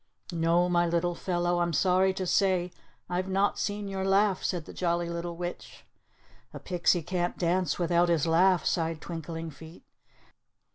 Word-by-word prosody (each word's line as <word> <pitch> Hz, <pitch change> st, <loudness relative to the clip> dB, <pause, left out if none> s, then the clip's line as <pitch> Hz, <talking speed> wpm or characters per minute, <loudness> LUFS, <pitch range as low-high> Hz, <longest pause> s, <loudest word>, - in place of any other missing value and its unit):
"No, 170 Hz, +1 st, +2 dB
my 175 Hz, -1 st, +2 dB
little 170 Hz, +1 st, 0 dB
fellow. 175 Hz, 0 st, -1 dB
I'm 170 Hz, -1 st, 0 dB
sorry 185 Hz, +3 st, +3 dB
to 185 Hz, -, -3 dB
say 180 Hz, -1 st, +1 dB, 0.4 s
I've 180 Hz, +1 st, -2 dB
not 195 Hz, +2 st, +1 dB
seen 205 Hz, 0 st, -2 dB
your 195 Hz, -1 st, -3 dB
laugh," 195 Hz, 0 st, +2 dB
said 175 Hz, -4 st, -2 dB
the -, -, -10 dB
Jolly 170 Hz, -1 st, -1 dB
Little 170 Hz, 0 st, -5 dB
Witch. 175 Hz, 0 st, -7 dB, 0.7 s
"A -, -, -6 dB
pixie 175 Hz, -1 st, +1 dB
can't 175 Hz, +1 st, -2 dB
dance 180 Hz, -2 st, 0 dB
without 175 Hz, 0 st, +2 dB
his 165 Hz, -4 st, +2 dB
laugh," 175 Hz, +3 st, +3 dB
sighed 165 Hz, -2 st, 0 dB
Twinkling 165 Hz, 0 st, -6 dB
Feet. 160 Hz, +4 st, -13 dB
175 Hz, 155 wpm, -28 LUFS, 170-185 Hz, 0.7 s, sorry